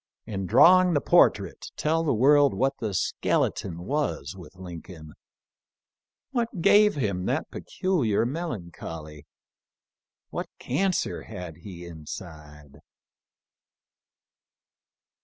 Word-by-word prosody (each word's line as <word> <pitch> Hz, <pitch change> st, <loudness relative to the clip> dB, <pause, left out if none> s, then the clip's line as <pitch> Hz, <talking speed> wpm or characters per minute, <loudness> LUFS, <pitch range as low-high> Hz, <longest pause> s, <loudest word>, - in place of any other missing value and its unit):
In 95 Hz, -4 st, -4 dB
drawing 180 Hz, -, +6 dB
the -, -, +4 dB
portrait -, -, +2 dB
tell 160 Hz, +2 st, +1 dB
the 155 Hz, -, +1 dB
world 140 Hz, +4 st, +5 dB
what 135 Hz, +1 st, +1 dB
the 110 Hz, -3 st, -2 dB
skeleton 85 Hz, -1 st, -1 dB
was 135 Hz, -, -2 dB
with 95 Hz, 0 st, -13 dB
Lincoln. 85 Hz, -3 st, -10 dB, 1.2 s
What 235 Hz, -6 st, -2 dB
gave 210 Hz, +4 st, +5 dB
him 100 Hz, -9 st, -2 dB
that -, -, -2 dB
peculiar 130 Hz, -, 0 dB
mel 165 Hz, +7 st, -3 dB
ancholy? 80 Hz, -5 st, -8 dB, 1.0 s
What -, -, -4 dB
cancer 180 Hz, +8 st, -1 dB
had 85 Hz, -3 st, -8 dB
he 90 Hz, -1 st, -10 dB
inside? 75 Hz, -3 st, -10 dB
100 Hz, 100 wpm, -26 LUFS, -, 1.2 s, drawing